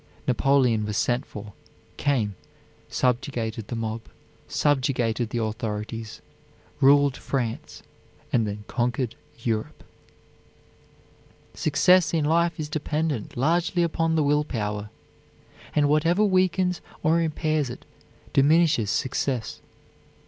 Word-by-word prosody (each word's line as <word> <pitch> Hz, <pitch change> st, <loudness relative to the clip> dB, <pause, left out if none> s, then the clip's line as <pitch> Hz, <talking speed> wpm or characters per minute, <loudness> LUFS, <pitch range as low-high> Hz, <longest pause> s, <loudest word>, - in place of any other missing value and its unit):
Napoleon 125 Hz, -3 st, +3 dB
was 105 Hz, -1 st, -2 dB
sent 120 Hz, +1 st, 0 dB
for, 105 Hz, -1 st, -9 dB, 0.4 s
came, 120 Hz, -8 st, +1 dB, 0.6 s
subjugated 120 Hz, -4 st, -1 dB
the -, -, -4 dB
mob, 115 Hz, 0 st, -3 dB, 0.5 s
subjugated 125 Hz, -5 st, +1 dB
the 120 Hz, -, -3 dB
authorities, 110 Hz, -2 st, -4 dB, 0.6 s
ruled 140 Hz, 0 st, +5 dB
France 130 Hz, +3 st, -4 dB, 0.5 s
and 115 Hz, -4 st, +3 dB
then 105 Hz, 0 st, -5 dB
conquered 125 Hz, 0 st, -1 dB, 0.3 s
Europe. 110 Hz, -2 st, -2 dB, 1.7 s
Success 170 Hz, +3 st, +3 dB
in 155 Hz, -2 st, +1 dB
life 170 Hz, +1 st, +2 dB
is 155 Hz, -, -2 dB
dependent 150 Hz, -5 st, -2 dB
largely 170 Hz, +6 st, +2 dB
upon 165 Hz, -1 st, 0 dB
the 155 Hz, -, +3 dB
will 150 Hz, +1 st, +3 dB
power, 105 Hz, -6 st, -3 dB, 0.9 s
and 145 Hz, -1 st, +4 dB
whatever 165 Hz, +7 st, +3 dB
weakens 185 Hz, -2 st, +2 dB, 0.2 s
or 160 Hz, +2 st, +3 dB
impairs 155 Hz, -3 st, 0 dB
it 120 Hz, -, -9 dB, 0.5 s
diminishes 150 Hz, -, +4 dB
success. 130 Hz, -1 st, -1 dB
135 Hz, 105 wpm, -25 LUFS, 115-155 Hz, 1.7 s, ruled